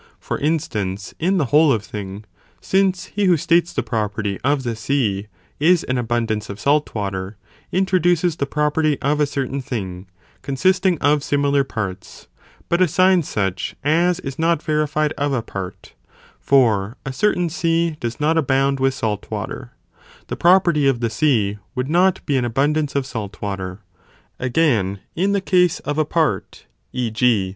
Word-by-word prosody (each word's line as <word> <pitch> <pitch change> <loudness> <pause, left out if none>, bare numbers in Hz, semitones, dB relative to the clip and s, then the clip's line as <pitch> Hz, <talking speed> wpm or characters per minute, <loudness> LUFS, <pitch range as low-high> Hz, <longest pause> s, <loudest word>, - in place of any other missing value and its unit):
For - - -4
instance, 110 - -2
in 185 +4 +1
the 155 - +2
whole 150 0 +6
of 110 -5 0
thing; 100 0 -7 0.3
since 190 -1 +1
he 205 -1 +1
who 180 -3 +4
states 170 +1 +2
the - - -2
property 105 -3 -2
of 140 0 +1
the 120 -2 -2
sea 110 -4 -1 0.3
is 170 +3 +4
an 125 0 -1
abundance 115 -2 -1
of 100 0 -7
salt 145 +2 +1
water, 100 -1 -4 0.3
introduces 180 -3 +2
the 140 - -2
property 150 0 +1
of 145 +2 0
a 150 - +3
certain 140 -1 -3
thing, 95 -7 -5 0.3
consisting 185 +6 +1
of 145 0 +3
similar 140 -1 +2
parts, 105 -8 -6 0.4
but 170 +1 +1
assigns 185 -1 +3
such 95 -3 -2
as 170 +4 +2
is 135 0 -6
not 165 -1 +1
verified 150 -1 0
of 145 0 0
a 120 -4 -1
part, 95 -4 -7 0.5
(for 115 -5 +2
a 135 - -4
certain 180 +3 +1
sea 165 0 +1
does 120 0 -4
not 160 +2 +2
abound 135 -1 +1
with 135 0 +1
salt 105 -4 -3
water,) - - -5 0.6
the - - -2
property 170 -5 +4
of 135 -3 +2
the 115 -2 -1
sea 110 -9 +1 0.2
would 125 +3 -2
not 185 +2 +2
be 140 - +1
an 125 - +1
abundance 145 +5 0
of 140 -2 0
salt 105 -5 -6
water. 95 -1 -5 0.6
Again, 120 - +1 0.2
in 195 +4 +1
the 200 - +1
case 180 -3 +2
of 145 +1 -2
a 155 - +2
part, 150 - -1 0.3
e. 125 -3 -2
g. 110 - -7
140 Hz, 165 wpm, -20 LUFS, 110-165 Hz, 0.6 s, whole